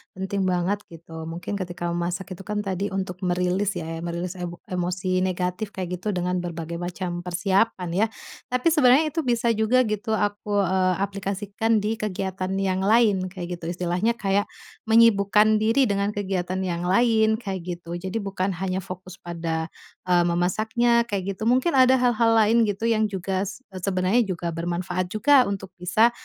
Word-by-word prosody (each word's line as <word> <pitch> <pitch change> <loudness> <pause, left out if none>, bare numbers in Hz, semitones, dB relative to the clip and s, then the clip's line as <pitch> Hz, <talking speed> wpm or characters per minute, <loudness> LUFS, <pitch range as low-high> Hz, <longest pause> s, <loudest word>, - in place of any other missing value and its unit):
penting 190 0 -2
banget 180 +3 0
gitu. 160 -1 -9
Mungkin 175 +5 -5
ketika 175 -1 -4
memasak 175 +3 -3
itu 185 - -7
kan 210 0 -2
tadi 195 +1 -2
untuk 190 -2 -4
merilis 180 +2 0
ya, 165 0 -4
merilis 170 +1 -4
emo 175 -1 -4
emosi 185 +1 -1
negatif 185 +2 -2
kayak 180 -1 -4
gitu 210 0 -2
dengan 180 0 0
berbagai 170 -1 -5
macam 175 0 -4
persiapan 185 +2 0
ya. 200 +6 +2 0.4
Tapi 250 +5 0
sebenarnya 300 +1 +5
itu 330 - -2
bisa 235 -1 +2
juga 225 +4 +3
gitu 215 0 -1
aku, 205 0 -1
eee, 185 0 +2
aplikasikan 200 +2 -1
di 220 +1 -1
kegiatan 190 -2 -3
yang 190 -1 0
lain 205 -2 +3
kayak 175 -2 -6
gitu. 165 - -6
Istilahnya 180 +6 0
kayak 200 -2 0 0.4
menyibukkan 215 -1 +5
diri 225 +5 +3
dengan 200 -2 0
kegiatan 185 -2 -2
yang 175 -1 -2
lain, 220 +1 +3
kayak 195 -5 -4 0.2
gitu. 170 0 -7
Jadi 190 +4 -4
bukan 195 -1 -2
hanya 190 +1 -2
fokus 185 0 -9
pada, 165 -1 -3 0.4
eee, 175 -1 +4
memasaknya 220 +7 +2
kayak 195 -1 -2
gitu. 215 - -6
Mungkin 255 +7 +2
ada 260 0 +6
hal-hal 235 -2 +3
lain 225 +2 +4
gitu 210 +2 -1
yang 220 -1 +2
juga 190 0 -2
s 205 - -6 0.2
sebenarnya 195 +5 +2
juga 175 -4 -4
bermanfaat 180 +2 -2
juga 255 +5 +5
untuk 195 -2 -4
bisa, 190 +7 +3
190 Hz, 160 wpm, -24 LUFS, 180-215 Hz, 0.4 s, ada